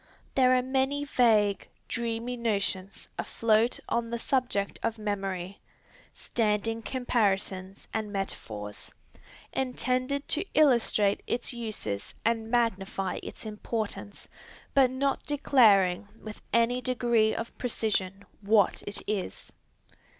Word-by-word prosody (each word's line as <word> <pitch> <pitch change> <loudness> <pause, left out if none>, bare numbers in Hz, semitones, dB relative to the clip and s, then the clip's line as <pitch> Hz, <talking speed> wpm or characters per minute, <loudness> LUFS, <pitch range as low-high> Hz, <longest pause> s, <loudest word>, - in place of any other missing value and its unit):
There 255 -1 +5
are 250 - +2
many 265 +2 0
vague, 215 -7 +3 0.2
dreamy 235 +1 -2
notions 200 -4 -2
afloat 230 +1 +2
on 235 -1 -1
the 235 - -2
subject 240 -5 0
of 230 0 -1
memory, 195 -3 -3 0.6
standing 225 0 0
comparisons 200 -6 -1
and 215 -2 -2
metaphors, 105 - -5 0.6
intended 255 +1 -1
to 320 - +3
illustrate 235 -8 +4
its 240 +1 -1
uses 215 - -4
and 225 -1 +1
magnify 195 -5 0
its - - -8
importance, 215 -1 -4 0.5
but 270 -2 +5
not 270 +2 -1
declaring 210 -10 +4
with 215 -1 -9
any 235 +3 +3
degree 235 -3 +2
of 230 - -5
precision 200 -5 -1 0.2
what 205 -1 +3
it 205 - -2
is. 200 - -4
225 Hz, 105 wpm, -28 LUFS, 200-250 Hz, 0.6 s, There